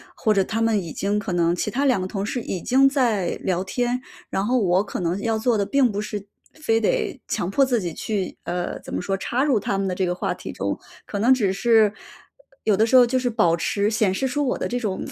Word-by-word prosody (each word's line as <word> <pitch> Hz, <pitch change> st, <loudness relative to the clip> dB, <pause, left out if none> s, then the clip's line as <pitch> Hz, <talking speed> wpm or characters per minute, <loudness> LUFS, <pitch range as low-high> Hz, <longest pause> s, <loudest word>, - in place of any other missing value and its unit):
或 220 Hz, -, +1 dB
者 200 Hz, -2 st, +3 dB
他 225 Hz, +4 st, -2 dB
们 225 Hz, -2 st, +2 dB
已 165 Hz, -, -7 dB
经 200 Hz, +1 st, -1 dB
可 200 Hz, -3 st, -3 dB
能 170 Hz, 0 st, +2 dB
其 210 Hz, -, -2 dB
他 270 Hz, +5 st, 0 dB
两 255 Hz, -8 st, +3 dB
个 185 Hz, -, -2 dB
同 195 Hz, +1 st, -3 dB
事 240 Hz, +4 st, -2 dB
已 185 Hz, -6 st, -4 dB
经 270 Hz, +2 st, +4 dB
在 240 Hz, -9 st, +1 dB
聊 185 Hz, -1 st, 0 dB
天， 245 Hz, +5 st, -1 dB, 0.3 s
然 195 Hz, -, -1 dB
后 250 Hz, +3 st, +2 dB
我 185 Hz, -1 st, +2 dB
可 200 Hz, -, -5 dB
能 175 Hz, +2 st, -1 dB
要 225 Hz, +1 st, 0 dB
做 230 Hz, 0 st, +2 dB
的 200 Hz, -, +1 dB
并 265 Hz, 0 st, +2 dB
不 205 Hz, -, -3 dB
是 210 Hz, -1 st, -4 dB, 0.3 s
非 225 Hz, -8 st, 0 dB
得 220 Hz, -, 0 dB
强 175 Hz, -, -2 dB
迫 275 Hz, +7 st, +3 dB
自 245 Hz, -4 st, 0 dB
己 175 Hz, -2 st, -3 dB
去 195 Hz, +2 st, -3 dB
呃， 175 Hz, 0 st, -3 dB
怎 -, -, -9 dB
么 -, -, -1 dB
说 195 Hz, +2 st, -1 dB
插 245 Hz, +6 st, -1 dB
入 270 Hz, -7 st, +2 dB
他 195 Hz, 0 st, -2 dB
们 195 Hz, -, -1 dB
的 180 Hz, -, -2 dB
这 190 Hz, -, 0 dB
个 175 Hz, -, 0 dB
话 180 Hz, -, -2 dB
题 -, -, -7 dB
中。 -, -, -3 dB, 0.3 s
可 205 Hz, -, -4 dB
能 235 Hz, +6 st, +5 dB
只 210 Hz, -7 st, +1 dB
是 215 Hz, +1 st, +4 dB, 0.7 s
有 210 Hz, -3 st, +3 dB
的 220 Hz, -, +4 dB
时 245 Hz, -, +2 dB
候 255 Hz, -, +9 dB
就 245 Hz, +2 st, +1 dB
是 250 Hz, -1 st, 0 dB
保 175 Hz, -7 st, +2 dB
持 200 Hz, +4 st, 0 dB
显 215 Hz, -3 st, +1 dB
示 265 Hz, +7 st, -1 dB
出 290 Hz, +2 st, -1 dB
我 -, -, 0 dB
的 -, -, -1 dB
这 245 Hz, -, -2 dB
种 210 Hz, -6 st, -3 dB
210 Hz, 280 characters per minute, -23 LUFS, 190-245 Hz, 0.7 s, 候